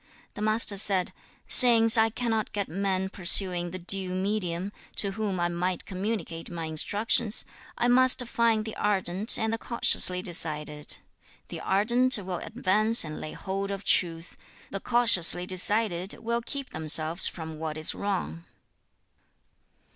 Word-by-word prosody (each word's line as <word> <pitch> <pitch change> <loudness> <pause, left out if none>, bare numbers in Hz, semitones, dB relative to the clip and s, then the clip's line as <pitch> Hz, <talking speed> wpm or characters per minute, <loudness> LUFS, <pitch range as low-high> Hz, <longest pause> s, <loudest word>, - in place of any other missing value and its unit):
The 210 - -10
Master 215 -1 +3
said, 190 -2 -1 0.3
'Since 225 -3 +8
I 225 -1 +3
cannot 225 -1 -4
get 200 -2 -4
men 190 +2 -3
pursuing 180 -1 +2
the 185 - -8
due 185 +1 -4
medium, 190 -1 -4 0.2
to 200 - 0
whom 200 -2 -5
I 175 - -1
might 175 +1 -4
communicate 190 -4 -6
my 170 -2 -7
instructions, 205 +7 +1 0.3
I 240 - -1
must 250 0 +4
find 230 -2 -1
the 220 - -8
ardent 195 0 +2
and 220 0 -3
the 225 - -4
cautiously 185 -6 +2
decided. 150 -4 -2 0.5
The - - -8
ardent 235 +6 +1
will 185 -3 -7
advance 220 0 +2
and 155 0 -9
lay 155 - -9
hold 195 +1 -6
of 200 0 -7
truth; 165 -1 -1 0.4
the 195 - -5
cautiously 195 -7 +3
decided 185 0 -2
will 235 +1 -4
keep 275 +3 -8
themselves 160 +2 0
from 160 -2 -9
what 160 -1 -6
is 155 - +2
wrong.' 180 - -6
195 Hz, 140 wpm, -25 LUFS, 175-220 Hz, 0.5 s, Since